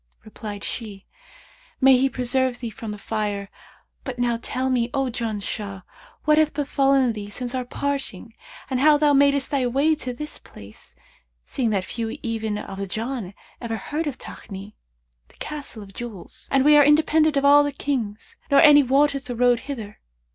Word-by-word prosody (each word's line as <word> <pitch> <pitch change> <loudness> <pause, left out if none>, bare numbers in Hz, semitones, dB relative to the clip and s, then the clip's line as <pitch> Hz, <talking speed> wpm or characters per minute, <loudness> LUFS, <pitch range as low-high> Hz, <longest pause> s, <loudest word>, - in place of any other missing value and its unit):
Replied 210 -1 -8
she, 205 -5 -6 0.7
'May 265 -1 +7
He 265 +2 +2
preserve 255 0 0
thee 235 -2 -6
from 220 +1 -8
the 210 - -5
Fire!, 205 -2 -3 0.5
but 260 -2 -5
now 240 -1 0
tell 260 +2 -2
me, 240 -2 +1
O 270 -2 0
Janshah, 210 -4 -4 0.4
what 305 0 +5
hath 305 -2 +2
befallen 275 -3 +2
thee 205 -2 -7
since 245 +4 -4
our 255 -1 -2
parting 255 -6 -4 0.3
and 260 -2 -1
how 300 +2 +6
thou 295 -1 +3
madest 280 0 +3
thy 270 -3 +1
way 280 +6 +2
to 280 -5 -4
this 300 +5 -5
place; 100 +1 -13 0.5
seeing 245 -4 -1
that 195 -3 0
few 225 -1 -4
even 220 -2 -2
of 195 -1 -7
the 200 - -3
Jann 220 -1 -4 0.3
ever 230 -2 -3
heard 300 +9 -3
of 270 -3 -4
Takni, 200 +1 -9 0.5
the - - -23
Castle 285 -7 -6
of 195 -1 -14
Jewels; 230 -6 -8
and 270 0 +2
we 300 0 +7
are 295 - +8
independent 305 +1 +4
of 275 - +1
all 290 +1 +7
the 290 - -1
Kings 240 -7 -4
nor 280 - +5
any 295 -2 +8
wotteth 280 +1 +2
the 245 - -4
road 245 0 +3
hither.' 220 -7 -6
250 Hz, 175 wpm, -23 LUFS, 215-280 Hz, 0.7 s, are